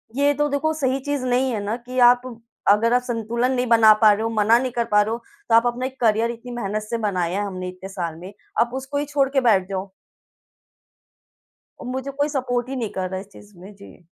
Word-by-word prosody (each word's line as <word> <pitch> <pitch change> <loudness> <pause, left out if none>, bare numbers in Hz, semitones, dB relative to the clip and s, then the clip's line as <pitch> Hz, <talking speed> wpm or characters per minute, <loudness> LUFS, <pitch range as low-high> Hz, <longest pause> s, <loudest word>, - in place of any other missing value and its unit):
ये 285 +1 +3
तो 295 +1 0
देखो 285 +3 0
सही 270 -3 -1
चीज़ 285 -3 -2
नहीं 255 +1 +1
है 215 -3 -3
ना 210 +2 -2
कि 255 0 -3
आप 245 0 +3 0.5
अगर 230 +3 +3
आप 250 - +3
संतुलन 235 +1 -1
नहीं 250 -1 0
बना 225 -2 +7
पा 215 -1 +7
रहे 205 - -3
हो, 225 - -1
मना 225 +1 +3
नहीं 255 0 -2
कर 235 -1 -1
पा 210 0 +5
रहे 210 +1 -1
हो 230 - -1 0.3
तो 225 - +5
आप 230 +1 +5
अपना 240 +1 -2
एक 265 0 -7
करियर 225 0 +2
इतनी 235 +1 -10
मेहनत 215 -3 -3
से 225 +2 -3
बनाया 190 -4 -1
है 205 - -1
हमने 185 -2 -5
इतने 185 +1 -10
साल 175 -4 -4
में, 185 +3 -9 0.3
आप 235 +1 +2
उसको 265 +2 -4
ही 290 - -1
छोड़ 285 -2 +1
के 270 -1 +1
बैठ 205 -7 +3
जाओ। 195 0 -4 1.9
मुझे 260 +2 -4
कोई 285 +2 -1
सपोर्ट 250 -4 -2
ही 270 - -4
नहीं 230 -5 -3
कर 185 -1 -3
रहा 190 0 -4
इस 195 - -11
चीज़ 205 0 -17
में 195 +4 -12
जी। 195 -2 -16
235 Hz, 235 wpm, -22 LUFS, 205-260 Hz, 1.9 s, बना